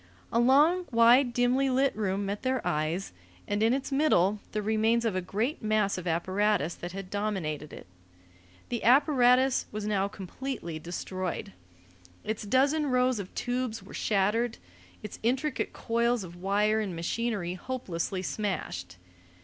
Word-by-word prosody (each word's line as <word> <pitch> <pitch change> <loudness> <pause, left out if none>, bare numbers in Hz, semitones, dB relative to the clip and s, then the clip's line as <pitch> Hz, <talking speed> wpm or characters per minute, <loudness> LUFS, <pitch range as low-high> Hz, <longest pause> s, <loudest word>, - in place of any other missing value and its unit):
A 230 - +3
long, 295 +9 +4
wide, 240 +2 +5
dimly 245 +3 +2
lit 265 +1 +2
room 200 -1 -1
met 200 +1 -3
their 260 -1 -1
eyes, 155 - -1 0.3
and 205 +1 -1
in 225 +1 +4
its 270 +2 -1
middle 215 - +3
the 210 -1 -2
remains 220 +2 +2
of 220 -4 0
a 185 - 0
great 215 - -2
mass 215 -2 +1
of 185 -1 -6
apparatus 185 0 +1
that 175 - -7
had 195 0 -7
dominated 185 -8 -3
it. - - -10 0.8
The 240 - -3
apparatus 255 0 +4
was 210 0 -4
now 200 -2 +1
completely 195 -3 -6
destroyed. 175 - -5 0.7
Its 215 0 -3
dozen 280 +6 +2
rows 250 -2 +2
of 190 -2 -6
tubes 245 -2 -2
were - - -13
shattered, 215 +3 +1 0.5
its 210 - -7
intricate 260 +5 0
coils 235 -1 0
of 175 -1 -10
wire 205 +4 +1
and 200 -5 -3
machinery 185 +1 -2
hopelessly 185 -4 -4
smashed. 90 - -4
215 Hz, 145 wpm, -28 LUFS, 190-250 Hz, 0.8 s, wide